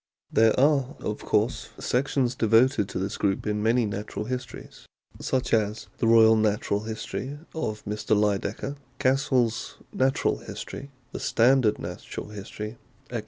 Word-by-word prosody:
There 110 Hz, +2 st, +4 dB
are, 140 Hz, -2 st, +3 dB
of -, -, -3 dB
course, -, -, 0 dB
sections 125 Hz, -1 st, 0 dB
devoted 115 Hz, -3 st, +3 dB
to -, -, -4 dB
this 95 Hz, +3 st, -3 dB
group 100 Hz, -2 st, 0 dB
in 105 Hz, 0 st, -1 dB
many 115 Hz, +2 st, +3 dB
Natural 105 Hz, +1 st, -4 dB
Histories, 125 Hz, +1 st, -7 dB, 0.3 s
such 130 Hz, -1 st, -1 dB
as 110 Hz, -1 st, 0 dB
the 115 Hz, -, +2 dB
Royal 115 Hz, -1 st, +7 dB
Natural 105 Hz, -1 st, +1 dB
History 125 Hz, +5 st, -5 dB, 0.2 s
of 110 Hz, -10 st, -4 dB
Mr. 105 Hz, +1 st, 0 dB
Lydekker, 105 Hz, +6 st, -1 dB, 0.2 s
Cassell's 130 Hz, -4 st, +1 dB, 0.2 s
Natural 135 Hz, +1 st, +1 dB
History, 140 Hz, -, -8 dB, 0.2 s
The -, -, -5 dB
Standard 120 Hz, -2 st, +3 dB
Natural -, -, -7 dB
History, 105 Hz, +2 st, -7 dB, 0.3 s
etc. 120 Hz, -, -1 dB
115 Hz, 135 wpm, -26 LUFS, 105-130 Hz, 0.3 s, Royal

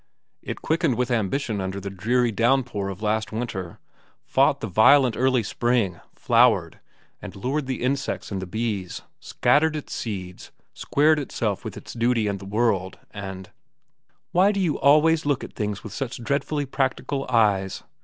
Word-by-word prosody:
"It -, -, -7 dB
quickened 160 Hz, -5 st, +1 dB
with 125 Hz, +1 st, -1 dB
ambition 110 Hz, 0 st, -1 dB
under 95 Hz, +1 st, -4 dB
the 100 Hz, 0 st, -6 dB
dreary 120 Hz, +5 st, +1 dB
downpour 115 Hz, -3 st, +1 dB
of 100 Hz, +2 st, -7 dB
last 110 Hz, 0 st, 0 dB
winter, 110 Hz, -7 st, -5 dB, 0.5 s
fought -, -, +3 dB
the -, -, -4 dB
violent 125 Hz, +5 st, +5 dB
early 130 Hz, -1 st, +2 dB
spring, 115 Hz, -5 st, 0 dB
flowered, -, -, +3 dB, 0.4 s
and -, -, -9 dB
lured 130 Hz, +7 st, -2 dB
the 130 Hz, -2 st, -3 dB
insects 140 Hz, -1 st, -2 dB
and 95 Hz, -1 st, -3 dB
the 95 Hz, -, -6 dB
bees, 105 Hz, -3 st, -3 dB, 0.2 s
scattered 155 Hz, +2 st, +2 dB
its 150 Hz, -, -6 dB
seeds, 95 Hz, -5 st, -6 dB, 0.2 s
squared 155 Hz, +2 st, +2 dB
itself 110 Hz, -7 st, -3 dB
with -, -, -7 dB
its -, -, -9 dB
duty 115 Hz, -1 st, +1 dB
and 100 Hz, -1 st, -2 dB
the 100 Hz, -, -10 dB
world, 100 Hz, -3 st, 0 dB
and—" 95 Hz, -2 st, -8 dB, 0.8 s
"Why 190 Hz, +4 st, +4 dB
do 200 Hz, -, -2 dB
you 170 Hz, -6 st, 0 dB
always 155 Hz, +3 st, +4 dB
look 145 Hz, -3 st, +1 dB
at -, -, -9 dB
things 105 Hz, -2 st, -3 dB
with 110 Hz, -, -8 dB
such 120 Hz, -1 st, -5 dB
dreadfully 140 Hz, +3 st, -1 dB
practical 135 Hz, +1 st, -2 dB
eyes?" 105 Hz, -5 st, +1 dB
115 Hz, 160 wpm, -24 LUFS, 100-135 Hz, 0.8 s, violent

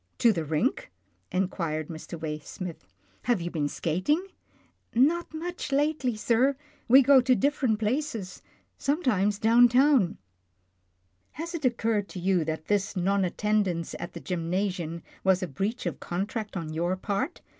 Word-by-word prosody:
" -, -, -44 dB
To 230 Hz, -, +7 dB
the 165 Hz, -4 st, -2 dB
rink? 150 Hz, -, -1 dB, 0.2 s
" 90 Hz, -, -42 dB
inquired 170 Hz, -4 st, -1 dB
Mr. 165 Hz, 0 st, -8 dB
Waysmith, 155 Hz, -, -6 dB, 0.2 s
" 95 Hz, 0 st, -35 dB
have 240 Hz, -, +3 dB
you 175 Hz, 0 st, -4 dB
been 150 Hz, -3 st, -1 dB
skating? 185 Hz, -, 0 dB, 0.3 s
" -, -, -36 dB
iorr3 240 Hz, -, +4 dB
" -, -, +9 dB
Not 345 Hz, +2 st, -3 dB
much 340 Hz, 0 st, -5 dB
lately, 280 Hz, -3 st, +1 dB
sir. 245 Hz, +5 st, +2 dB, 0.3 s
We 265 Hz, +3 st, +8 dB
go 270 Hz, 0 st, +7 dB
to 255 Hz, 0 st, +3 dB
different 260 Hz, -6 st, +1 dB
plapfg 225 Hz, -4 st, -2 dB, 0.2 s
— -, -, -42 dB
sometimes 245 Hz, -, +1 dB
down 230 Hz, +3 st, +6 dB
town.", 260 Hz, 0 st, +5 dB
r 175 Hz, -, -4 dB, 0.7 s
" 90 Hz, 0 st, -44 dB
Has 335 Hz, +3 st, -6 dB
it 315 Hz, -5 st, -3 dB
occurred 225 Hz, -4 st, +1 dB
to 185 Hz, -, -7 dB
you 180 Hz, -1 st, +2 dB
that 160 Hz, 0 st, -3 dB
this 205 Hz, -1 st, 0 dB
non 195 Hz, +2 st, +1 dB
attendance 185 Hz, -3 st, 0 dB
at 170 Hz, -, -6 dB
the -, -, -6 dB
gymnasium 175 Hz, -1 st, -2 dB, 0.2 s
was 190 Hz, 0 st, +3 dB
a -, -, -1 dB
breach 200 Hz, -, -3 dB
of -, -, -3 dB
contract 205 Hz, +4 st, -3 dB
on 160 Hz, -3 st, -5 dB
your 175 Hz, +3 st, 0 dB
part? 200 Hz, -, -2 dB
200 Hz, 175 wpm, -27 LUFS, 170-250 Hz, 0.7 s, "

